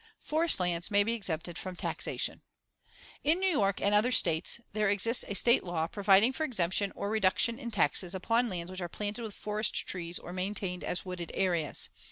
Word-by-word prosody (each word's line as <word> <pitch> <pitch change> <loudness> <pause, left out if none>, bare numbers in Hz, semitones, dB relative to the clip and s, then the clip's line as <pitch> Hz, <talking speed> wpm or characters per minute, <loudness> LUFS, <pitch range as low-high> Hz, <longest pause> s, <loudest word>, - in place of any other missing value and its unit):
Forest 320 - +1
lands 175 0 -1
may 205 -1 +4
be 230 +3 -1
exempted 175 -6 -4
from 185 -1 -6
taxation: - - -3 0.8
In 310 +4 +3
New 380 - +1
York 200 - +1
and 200 - +1
other 215 +5 +3
States 165 -1 +3
there 215 -1 +1
exists 215 +4 +2
a 200 - -4
State 235 +5 +4
law 175 -3 -2
providing 200 +6 +3
for 315 - -3
exemption 195 - 0
or 200 - -3
reduction 220 +3 +2
in 240 -4 -5
taxes 180 -2 +1
upon 230 +6 +1
lands 175 -2 -5
which 185 0 -6
are 175 - -4
planted 210 +5 -4
with 220 -3 -6
forest 210 +1 -2
trees 175 -1 -2
or 175 - -9
maintained 185 -1 -3
as 180 - -2
wooded 180 -2 -6
areas. 175 -5 0
200 Hz, 190 wpm, -30 LUFS, 180-225 Hz, 0.8 s, may